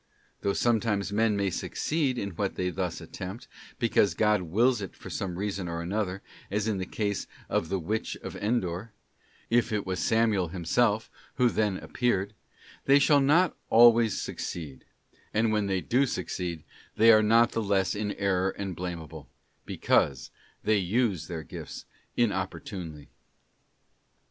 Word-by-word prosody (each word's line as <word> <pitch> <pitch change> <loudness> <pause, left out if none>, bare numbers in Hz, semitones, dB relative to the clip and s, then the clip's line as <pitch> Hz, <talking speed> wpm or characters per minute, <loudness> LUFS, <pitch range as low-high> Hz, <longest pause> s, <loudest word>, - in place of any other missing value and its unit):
Though 100 - +1
sometimes 110 -4 +1
men 110 -1 +2
may 100 -1 0
succeed 140 - -1
in 100 -3 -3
what 95 +3 -2
they 90 0 -1
thus 90 -2 -3
attempt, 95 +6 -8 0.3
because 115 -4 +2
God 105 -2 +3
wills 110 +8 +2
it 95 - -7
for - - -10
some 90 -2 -3
reason 100 -2 -3
or 85 0 -3
other, 100 -3 -2 0.3
as 105 +2 -1
in 105 -3 0
the 95 - -4
case 100 -2 -2 0.2
of 80 - 0
the 95 - 0
Witch 105 +6 -3
of - - -6
Endor—if 110 +3 -3
it 105 -2 -1
was 95 -1 -2
Samuel 110 -5 +2
himself 105 +6 0 0.2
who 125 -2 +4
then 105 -4 0
appeared—they 120 +5 -1
shall 145 0 +5
not 165 +6 +4
always 115 -2 +6
succeed; 75 -6 -6 0.5
and 110 +1 +3
when 105 -2 +1
they 95 -1 0
do 130 +7 +2
succeed, 85 -8 -4 0.3
they 115 +1 +7
are 110 -1 +7
not 115 +2 +4
the 115 - -1
less 100 -3 +1
in 105 0 -2
error 95 -1 +1
and 95 -2 -5
blameable, 80 -6 -7 0.4
because 70 -4 +1 0.3
they 110 0 +3
use 100 -1 0
their 85 -3 -5
gifts - - -8 0.3
inopportunely. 95 -7 -3
100 Hz, 145 wpm, -28 LUFS, 90-115 Hz, 0.5 s, they